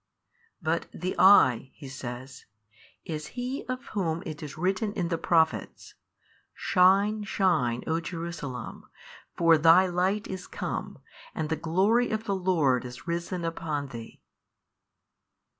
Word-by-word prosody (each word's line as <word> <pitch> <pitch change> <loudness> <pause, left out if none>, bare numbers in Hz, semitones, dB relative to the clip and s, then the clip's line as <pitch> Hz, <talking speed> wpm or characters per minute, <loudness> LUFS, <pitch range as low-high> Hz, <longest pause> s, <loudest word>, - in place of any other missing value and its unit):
But 165 +1 0
the 185 +1 -4
I 130 - +6
(He 140 - -10
says) 130 0 -8 0.6
is 155 -2 -5
He 255 +3 -3
of 255 0 -5
Whom 170 -5 -2
it 155 0 -6
is 150 -2 -8
written 190 +5 0
in 175 -4 -2
the 165 - 0
Prophets, 160 -2 0 0.6
Shine 200 +4 +3
shine 160 - +1
o 160 +1 0
Jerusalem 165 -8 -6 0.5
for 165 -2 +5
thy 165 +4 +7
Light 185 +4 0
is 190 -1 -6
come, - - -5 0.4
and 155 -1 -2
the 160 - +1
glory 195 +10 +2
of 220 0 -2
the 200 -3 -1
Lord 165 -9 +2
is 125 -2 -10
risen 170 +1 -3
upon 155 -4 -3
thee. 115 -2 -10
170 Hz, 130 wpm, -27 LUFS, 150-190 Hz, 0.6 s, thy